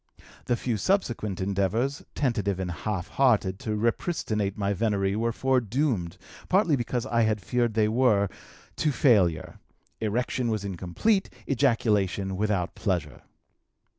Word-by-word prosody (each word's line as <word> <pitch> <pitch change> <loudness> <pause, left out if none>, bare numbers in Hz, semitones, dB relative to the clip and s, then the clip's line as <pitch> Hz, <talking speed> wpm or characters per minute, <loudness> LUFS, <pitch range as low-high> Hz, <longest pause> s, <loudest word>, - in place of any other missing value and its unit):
"The 120 - +1
few 120 -1 -2
subsequent 115 - 0
endeavors, 100 +8 0
tentative 105 -8 0
and 90 -1 -2
half 95 0 -3
hearted, 105 -8 +2
to 105 -1 -2
repristinate 110 - -1
my 100 -1 0
venery 100 -2 0
were 115 +2 0
foredoomed, 125 - 0 0.3
partly 185 -5 +4
because 120 -1 -2
I 115 -3 +1
had 110 -1 +2
feared 120 +3 0
they 110 -1 +3
were, 110 -3 +3 0.5
to 150 - +1
failure: 100 - +2 0.4
erection 120 +3 -1
was 110 -3 -2
incomplete, 100 - 0 0.2
ejaculation 110 -8 +1
without 100 -3 -1
pleasure. 90 -8 -2
110 Hz, 125 wpm, -27 LUFS, 100-125 Hz, 0.5 s, partly